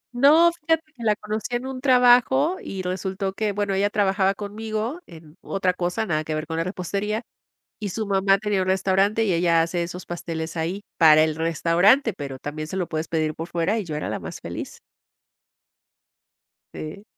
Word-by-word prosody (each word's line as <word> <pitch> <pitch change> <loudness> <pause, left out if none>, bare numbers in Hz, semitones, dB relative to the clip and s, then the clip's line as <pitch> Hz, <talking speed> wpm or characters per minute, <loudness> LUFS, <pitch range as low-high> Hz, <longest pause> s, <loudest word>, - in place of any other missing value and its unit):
No, 305 +7 +6
fíjate 325 -1 0
que 245 - -14
la 215 -2 +3
conocí 215 +3 -4
en 240 +1 -3
un 265 -1 -6
trabajo 260 +5 +4
y 190 -1 -5
resultó 190 +1 -3
que, 210 +1 -1
bueno, 200 0 -1
ella 200 +1 +2
trabajaba 195 -1 +1
conmigo 220 - -4
en 160 -1 -14
otra 190 -2 -1
cosa, 180 +5 -2
nada 155 -6 -1
que 155 0 -3
ver 155 0 -3
con 160 +1 -4
la 165 - +1
repostería 200 +4 -3 0.6
y 210 -2 -3
su 220 +4 -3
mamá 195 0 +3
tenía 205 -2 0
un - - -5
restaurante 195 +3 +2
y 210 - +1
ella 170 -1 +3
hace 170 +1 -1
esos 175 +1 -7
pasteles 165 -1 -5
ahí 170 +5 -2 0.2
para 155 -2 +7
el 155 -1 0
restaurante, 170 - +3
pero 140 -6 -7
también 155 +2 -5
se 170 - -6
lo 180 -3 -2
puedes 155 0 -3
pedir 155 -2 -1
por 165 - -6
fuera 175 +6 0
y 205 - -4
yo 155 -3 -5
era 150 - -3
la - - -3
más - - -8
feliz. - - -7 1.9
Sí. 155 +7 -7
190 Hz, 190 wpm, -24 LUFS, 165-215 Hz, 1.9 s, para